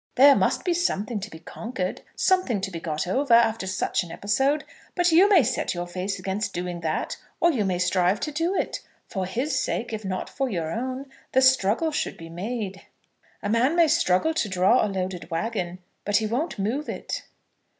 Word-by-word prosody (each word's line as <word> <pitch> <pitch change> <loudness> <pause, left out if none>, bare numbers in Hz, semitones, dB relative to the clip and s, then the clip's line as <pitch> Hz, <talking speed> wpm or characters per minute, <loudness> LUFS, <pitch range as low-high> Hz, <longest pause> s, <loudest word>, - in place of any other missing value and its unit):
There 280 +2 +8
must - - +1
be 355 - +2
something 235 - -1
to 205 +2 -6
be 160 - -10
conquered, 185 +3 -5
something 370 - +2
to 195 0 -3
be 170 - -5
got 155 -2 -2
over, 245 +6 +3
after 225 -4 +3
such 185 0 0
an 170 - -10
episode. 270 - +1 0.3
But 355 -1 +3
you 365 +5 +6
may 370 -8 +6
set - - -1
your 175 0 -3
face 185 +3 -3
against 195 +2 -3
doing 175 -1 -4
that, 160 -1 -2 0.2
or 345 - +4
you 225 -9 0
may 185 -2 0
strive 180 +2 +2
to 305 - -2
do 330 +6 0
it. - - -1 0.3
For 190 -3 -3
his 255 +7 -1
sake, 230 0 -2
if 215 0 -4
not 185 -1 -3
for 270 -1 -2
your 165 -6 -2
own, 255 +6 -3 0.3
the 260 - +5
struggle 260 +4 +3
should 300 - -2
be 165 -1 -10
made." 195 +2 -4 0.6
"A 205 - -1
man 245 +8 +3
may 340 -2 +5
struggle 310 - +2
to 225 -9 0
draw 190 +6 +4
a - - 0
loaded 185 -3 -4
wagon, 180 0 -2 0.3
but 205 0 +2
he 220 - 0
won't 250 +9 -2
move 235 +10 -2
it." - - -4
210 Hz, 200 wpm, -25 LUFS, 185-270 Hz, 0.6 s, There